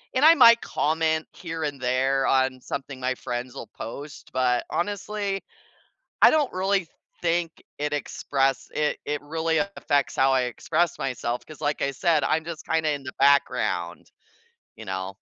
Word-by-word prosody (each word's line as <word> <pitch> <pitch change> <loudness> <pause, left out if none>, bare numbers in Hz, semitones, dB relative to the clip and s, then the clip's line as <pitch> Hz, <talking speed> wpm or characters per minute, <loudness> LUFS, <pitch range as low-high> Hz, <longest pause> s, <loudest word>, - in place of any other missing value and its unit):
And 260 +3 +4
I 325 - +10
might 235 -6 +8
comment 160 0 0
here 165 -2 -6
and 145 -2 -3
there 130 +2 +1
on 130 -1 +2
something 140 0 -6
my 130 0 0
friends'll 120 0 -5
post, 140 +6 -8
but 125 -1 +1
honestly, 200 +1 -2 0.8
I - - +10
don't 300 -4 +2
really 190 0 +1 0.3
think 170 -1 +1 0.3
it 150 0 -2
express 135 -2 -1
it 150 0 0
it 150 0 -2
really 160 +2 -1
affects 145 -8 0
how 135 0 +3
I 130 -1 +3
express 155 +7 -1
myself, 120 -2 -3
'cause 155 - -13
like 145 0 -1
I 140 - +1
said, 155 +3 +1
I'm 160 +1 +1
just 165 -1 -7
kinda 160 -1 +1
in 145 -1 -4
the 130 - -6
background, 140 +1 +2 0.7
you 110 - -10
know? 95 0 -4
145 Hz, 155 wpm, -25 LUFS, 130-165 Hz, 0.8 s, I